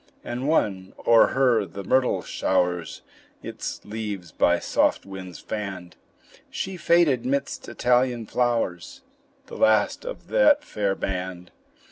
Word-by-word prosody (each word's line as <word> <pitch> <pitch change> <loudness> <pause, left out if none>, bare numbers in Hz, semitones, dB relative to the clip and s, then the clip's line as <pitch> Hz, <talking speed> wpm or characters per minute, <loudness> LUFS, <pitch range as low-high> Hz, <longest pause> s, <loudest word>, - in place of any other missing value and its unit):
And 125 +3 -4
one 95 -11 0
o'er 115 -1 +6
her 125 -5 +2
the 100 0 -8
myrtle 130 +6 +1
showers 90 -3 -1 0.4
Its - - -6
leaves 105 -5 -5
by - - +3
soft - - +1
winds 95 -2 -8
fanned; 95 -5 -6 0.5
She 190 0 -4
faded 170 -7 +3
midst 140 +2 -2
Italian 125 -1 +1
flowers 115 -8 -1 0.4
The - - -10
last 110 -2 +3
of - - -8
that 300 - +4
fair 100 - -1
band. 90 -1 -5
110 Hz, 120 wpm, -24 LUFS, 95-130 Hz, 0.5 s, o'er